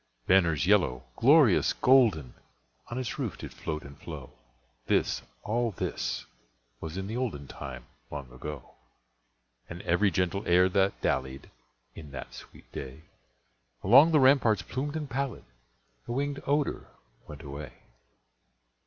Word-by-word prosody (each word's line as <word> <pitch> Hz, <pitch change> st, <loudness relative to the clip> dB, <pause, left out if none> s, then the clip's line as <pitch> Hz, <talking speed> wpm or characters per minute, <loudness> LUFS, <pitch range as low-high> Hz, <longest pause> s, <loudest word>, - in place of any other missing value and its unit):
Banners 85 Hz, -6 st, +3 dB
yellow, 85 Hz, -11 st, +3 dB
glorious, 135 Hz, -, +5 dB
golden, 115 Hz, -, +4 dB, 0.5 s
On 120 Hz, -, -5 dB
its 130 Hz, -2 st, -4 dB
roof -, -, -3 dB
did -, -, -8 dB
float 75 Hz, -1 st, -5 dB
and 70 Hz, 0 st, -11 dB
flow, -, -, -8 dB, 0.6 s
(This—all 110 Hz, -, -1 dB
this—was -, -, -6 dB
in 95 Hz, -, -3 dB
the 110 Hz, +3 st, -5 dB
olden 110 Hz, -, -3 dB
Time 65 Hz, -4 st, -8 dB, 0.2 s
long 70 Hz, -4 st, -7 dB
ago,) 65 Hz, +1 st, -8 dB, 1.0 s
And 85 Hz, +2 st, -8 dB
every 90 Hz, +4 st, +3 dB
gentle 90 Hz, +2 st, 0 dB
air 90 Hz, +2 st, +5 dB
that 95 Hz, +1 st, +1 dB
dallied, 65 Hz, +1 st, -2 dB, 0.4 s
In 75 Hz, +1 st, -10 dB
that -, -, -7 dB
sweet -, -, -14 dB
day, 65 Hz, +4 st, -8 dB, 0.8 s
Along 135 Hz, -, +7 dB
the 155 Hz, -, +5 dB
ramparts 130 Hz, -5 st, +4 dB
plumed 145 Hz, +3 st, -4 dB
and 155 Hz, -2 st, -3 dB
pallid, 135 Hz, 0 st, -3 dB, 0.6 s
A -, -, -13 dB
wingèd 140 Hz, +3 st, -2 dB
odor 145 Hz, +1 st, 0 dB, 0.4 s
went 75 Hz, 0 st, -10 dB
away. 70 Hz, -1 st, -7 dB
90 Hz, 125 wpm, -29 LUFS, -, 1.0 s, Along